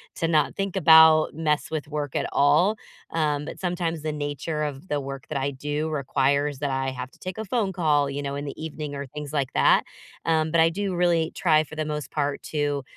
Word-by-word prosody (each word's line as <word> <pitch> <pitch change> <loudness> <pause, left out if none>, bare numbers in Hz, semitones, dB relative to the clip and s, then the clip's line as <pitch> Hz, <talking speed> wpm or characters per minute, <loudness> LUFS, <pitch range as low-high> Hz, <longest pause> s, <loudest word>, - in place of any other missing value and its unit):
to 165 - -1
not 155 -2 +2
think 195 -1 -2
about 160 -2 +7
mess 150 -1 -1
with 155 -2 -4
work 145 -2 -4
at - - 0
all. 155 +10 +3 0.3
Um, 150 -3 0
but - - -8
sometimes 175 -3 -2
the 155 0 -2
nature 150 +1 -3
of 145 +3 -5
the 145 -1 -1
work 135 -1 -7
that 150 - -3
I 140 +1 -1
do 150 +3 -3
requires 140 0 0
that 145 - -1
I 135 0 -1
have 125 0 -7
to - - -23
take 185 +2 -6
a 220 - -3
phone 200 -3 -1
call, 150 -5 +2
you 140 +1 -4
know, 140 0 -4
in 145 +1 -4
the 145 +2 -7
evening 150 -2 -5
or 140 0 -5
things 150 +2 -8
like 140 -3 -1
that. - - +4 0.4
Um, 160 -1 +1
but 165 -1 +4
I 165 - +5
do 190 +1 -3
really 170 -2 +2
try 155 -3 +3
for 160 - -11
the 155 -1 -2
most 150 -1 -4
part 145 -1 -1
to, 145 -2 -1
150 Hz, 225 wpm, -25 LUFS, 145-160 Hz, 0.4 s, about